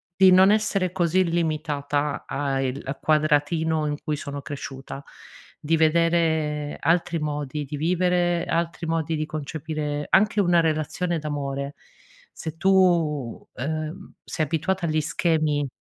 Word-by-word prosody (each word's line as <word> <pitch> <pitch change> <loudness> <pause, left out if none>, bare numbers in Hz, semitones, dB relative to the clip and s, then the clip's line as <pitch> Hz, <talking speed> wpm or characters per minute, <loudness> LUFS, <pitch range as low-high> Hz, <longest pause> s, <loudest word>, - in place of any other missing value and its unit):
di 190 0 +6
non 190 +2 +7
essere 210 -4 +1
così 185 0 +2
limitata 150 -3 -1
a 140 -1 -1
il 135 +1 -2
a 135 +2 -3
quadratino 155 +1 +1
in 145 0 -2
cui 155 -1 -2
sono 145 0 -6
cresciuta, 135 -1 -7 0.6
di 155 +2 +1
vedere 160 -2 +1
altri 170 +1 +1
modi 150 -1 -3
di 145 +2 -6
vivere, 175 +1 +1
altri 170 0 -2
modi 165 -1 -1
di 155 0 -2
concepire 150 -1 -4
anche 210 +2 +3
una 175 -2 +4
relazione 160 +2 -1
d'amore. 140 -2 -4 0.6
Se 160 0 -6
tu, 190 - -1 0.9
uhm, 155 +7 -5
sei 155 - -2
abituata 170 +4 -1
agli 155 0 +1
schemi 155 -2 0
155 Hz, 130 wpm, -24 LUFS, 145-170 Hz, 0.9 s, non